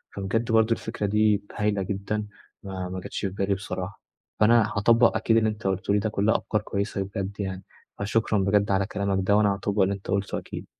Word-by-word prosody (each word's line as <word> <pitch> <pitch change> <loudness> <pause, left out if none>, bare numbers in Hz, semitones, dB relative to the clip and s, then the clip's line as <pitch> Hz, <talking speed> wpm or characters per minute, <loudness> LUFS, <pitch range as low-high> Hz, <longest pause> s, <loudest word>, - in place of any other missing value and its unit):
فبجد 110 +5 -1
برضه 110 0 +4
الفكرة 110 -2 -2
دي 105 0 +2
هايلة 105 -1 0
جدًا، 105 +2 -3 0.4
ما 95 -2 -5
ما 95 0 -4
جَتش - - -6
في 100 - -1
بالي 100 +1 -1
بصراحة، 95 0 -6 0.4
فأنا 115 0 +4
هاطبّق 115 +3 +4
أكيد 115 0 +2
اللي 110 -1 +3
أنت 105 -1 -4
قُلته 95 +1 0
لي 105 - +3
ده 110 +1 -1
كلها 105 +1 +2
أفكار 105 -1 -2
كويّسة 100 -1 -2
بجد 100 +1 -4
يعني. 95 -2 -4 0.4
فشكرًا 105 +1 +1
بجد 100 +1 +2
على 95 0 +2
كلامك 100 -2 -1
ده، 100 - +5
وأنا 105 -2 +3
هاطبّق 100 +1 -1
اللي 95 +1 +3
أنت 100 -1 -9
قُلته 100 0 -1
أكيد. - - -7
100 Hz, 200 wpm, -26 LUFS, 95-105 Hz, 0.4 s, ده